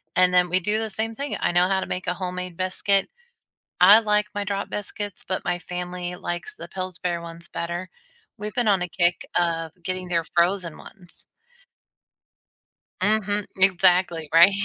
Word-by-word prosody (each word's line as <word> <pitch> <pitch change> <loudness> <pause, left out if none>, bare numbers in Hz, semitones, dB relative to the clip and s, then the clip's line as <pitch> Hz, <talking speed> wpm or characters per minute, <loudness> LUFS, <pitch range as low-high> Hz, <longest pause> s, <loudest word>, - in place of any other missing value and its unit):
And 180 0 +5
then 180 0 +4
we 180 +2 +3
do 210 +4 0
the 220 0 -2
same 220 +2 -3
thing. 280 +4 -3
I - - +1
know 175 +1 +4
how 190 0 +1
to - - -3
make 185 - -4
a - - +1
homemade 180 -1 -5
biscuit. 195 +1 +1 0.7
I 200 +5 +9
like 210 -1 +2
my 205 - -2
drop 200 0 -3
biscuits, 205 -1 -5
but 185 - -2
my 175 -1 0
family 180 0 -5
likes 175 -1 -5
the 170 - -8
Pillsbury 180 -2 -3
ones 170 0 -10
better. 175 +2 -4 0.5
We've 210 +1 -4
been 240 -3 +1
on 195 -3 +3
a 180 - -2
kick 175 0 +1
of 165 -2 -1
getting 185 0 -3
their 170 -2 0
frozen 175 -1 +2
ones. 180 -2 -14 1.8
Mhm, 205 -1 +1
exactly, 180 -4 +3
right? 170 +4 +8
180 Hz, 170 wpm, -24 LUFS, 175-200 Hz, 1.8 s, I